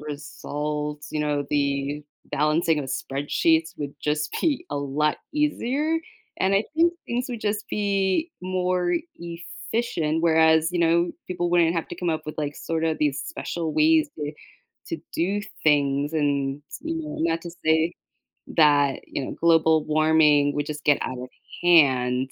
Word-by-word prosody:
results, 150 0 -5
you 155 - -1
know, 145 -1 0
the 140 0 0 0.2
balancing 155 +2 +1
of 135 - -5
spreadsheets 160 +5 0
would 145 -1 -5
just 150 0 -1
be 300 -6 0
a 145 - -2
lot 145 +2 0
easier, 300 +1 0 0.4
and 190 +1 +2
I 200 - +3
think 335 +2 +4
things 245 +1 -2
would 235 -3 -5
just 210 0 -2
be 200 - 0
more 180 -1 0 0.2
efficient, 170 -1 -3
whereas, 160 0 +4
you 175 - 0
know, 170 +1 +3 0.2
people 175 -1 -1
wouldn't 170 -1 +3
have 165 - -1
to - - -6
come 175 -2 -2
up 155 -1 -3
with, 155 - -6
like, 145 -1 -3
sorta 160 -1 -1
these 145 -3 +1
special 170 - -4
ways 315 0 +4
to 150 0 -3 0.5
to 335 - -5
do 195 +5 0 0.2
things 145 0 +2
and, 140 -2 0 0.2
you 325 0 -3
know, 310 -2 -5
not 165 0 +1
to 170 - -8 0.2
say 160 +1 +3 0.6
that, 145 -3 +4
you 140 - -4
know, - - -5
global 160 -2 +4
warming 155 -2 +4
would 145 0 -1
just 150 0 -6
get 145 -2 +4
out 130 -1 -4
of 125 0 -7 0.3
hand, 130 -6 +4
160 Hz, 155 wpm, -24 LUFS, 145-180 Hz, 0.6 s, think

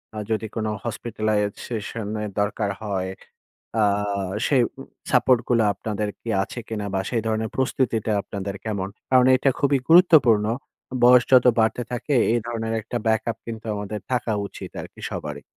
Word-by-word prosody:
আ - - -6
যদি 110 0 -1
কোন 110 -2 -1 0.2
hospitalize 110 -2 -1
session 110 -1 -4 0.2
এর 105 - -3
দরকার 105 0 -1
হয়, 95 -3 -2 0.7
আ - - +4 0.6
সেই 130 -4 +4 0.2
উম 135 - -11 0.2
support 125 -1 +4
গুলা 115 -2 +3
আপনাদের 105 0 -3
কি - - -9
আছে 120 - -6
কিনা 105 -2 -3
বা 95 - +1
সেই 115 -3 0
ধরনের 110 0 -1
প্রস্তুতিটা 120 -4 0
আপনাদের 100 0 -5
কেমন? 100 -4 -2 0.2
কারণ 130 -1 +6
এটা 135 +1 +2
খুবই 140 -1 +3
গুরুত্বপূর্ণ। 150 - +6 0.6
বয়স 125 0 +7
যত 125 -1 +7
বাড়তে 110 +2 +1
থাকে, 125 +4 -1 0.2
এই 120 - +2
ধরনের 115 -1 -3
একটা 115 +3 -5
backup 110 0 0
কিন্তু 115 -1 -7
আমাদের 105 +1 -5
থাকা 120 -2 0
উচিত - - -9
আরকি - - -12
সবারই। 75 -1 -5
110 Hz, 160 wpm, -23 LUFS, 105-125 Hz, 0.7 s, বয়স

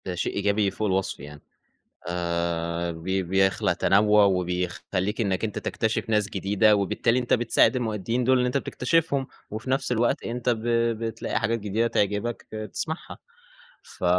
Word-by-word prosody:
ده 90 - -3
شيء 85 - -2
إيجابي 100 0 +1
فوق 105 +2 -2
الوصف 95 -1 -1
يعني، 75 +1 -10 0.7
آآ، 85 -1 -2
ب 80 0 -10
بيخلق 95 +1 +1
تنوع 105 +1 +4
وبيخلّيك 90 +2 -1
إنك 95 -3 -1
أنت 110 -2 -2
تكتشف 110 0 -2
ناس 105 -2 +2
جديدة، 105 +2 +3
وبالتالي 105 +4 +1
أنت 125 - 0
بتساعد 120 +2 +3
المؤديين 115 0 -1
دول 130 +2 +4
اللي 125 0 +2
أنت 125 - 0
بتكتشفهم، 140 +1 0 0.2
وفي 110 +4 -6
نفس 135 -1 0
الوقت 120 0 +1
أنت 120 +1 -2
ب 115 -2 0 0.4
بتلاقي 115 -1 -2
حاجات 115 +1 0
جديدة 105 +3 0
تعجبك 105 +1 -1
ت - - -7
تسمعها، 130 +9 -5 0.7
ف - - -9
105 Hz, 150 wpm, -25 LUFS, 95-115 Hz, 0.7 s, تنوع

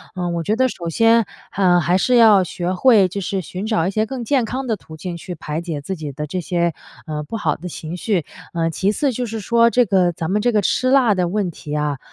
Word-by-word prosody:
呃， 180 -1 -2
我 170 0 -2
觉 205 +7 0
得 260 +2 +3
首 170 -8 -5
先， 225 +5 +3 0.3
呃， 180 -2 +4
还 175 +2 +1
是 250 - +2
要 220 -5 +7
学 180 +1 -3
会 210 -1 +5
就 195 +2 -5
是 190 +1 -2
寻 185 +4 -6
找 185 -6 +1
一 - - -1
些 215 +2 0
更 255 -1 -5
健 255 -1 +2
康 260 +4 -4
的 230 -3 0
途 160 -5 -13
径 175 +2 -5
去 175 +1 -7
排 155 +1 -4
解 165 -4 -4
自 190 +7 -5
己 150 -3 -6
的 150 +3 -5
这 180 +5 -4
些， 170 0 0 0.3
呃， 150 -2 -4
不 185 +10 -5
好 160 -7 0
的 180 - -8
情 165 +1 -7
绪， 180 -4 -1 0.3
呃， 165 -1 0
其 190 +5 0
次 275 +5 0
就 245 +1 -3
是 225 0 -5
说 235 +3 +3
这 245 0 +3
个 185 -3 +2
咱 165 +1 -4
们 210 +2 +1
这 245 - +2
个 215 - +2
吃 255 +7 +1
辣 255 -5 +4
的 180 -2 0
问 195 0 -1
题 150 -2 -7
啊， 150 -3 -1
185 Hz, 275 characters per minute, -20 LUFS, 170-225 Hz, 0.3 s, 要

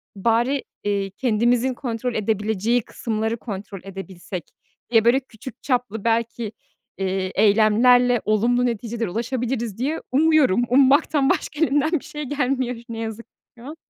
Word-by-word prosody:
"bari, 235 +7 +1 0.2
eee, 200 -1 -1
kendimizin 240 +4 +1
kontrol 240 -1 -4
edebileceği 220 +2 0
kısımları 220 +1 -3
kontrol 200 -3 -7
edebilsek" 190 -2 -7 0.5
diye 225 -2 +4
böyle 240 +3 +5
küçük 255 -2 -12
çaplı 245 -6 -1
belki, 230 -1 -1 0.5
eee, 190 -1 -2
eylemlerle 225 +4 +4
olumlu 235 +4 +2
neticelere 230 -2 -2
ulaşabiliriz 235 0 -3
diye 285 +7 -2
umuyorum. 285 -6 +4
Ummaktan 275 +2 +4
başka 300 - -1
elimden 290 +1 +1
bir - - -19
şey 300 -1 -6
gelmiyor 260 -2 -1
ne 230 - -5
yazık 225 0 -5
ki - - -71 0.2
şu 235 - -13
an. 300 +3 -7
235 Hz, 135 wpm, -22 LUFS, 215-255 Hz, 0.5 s, böyle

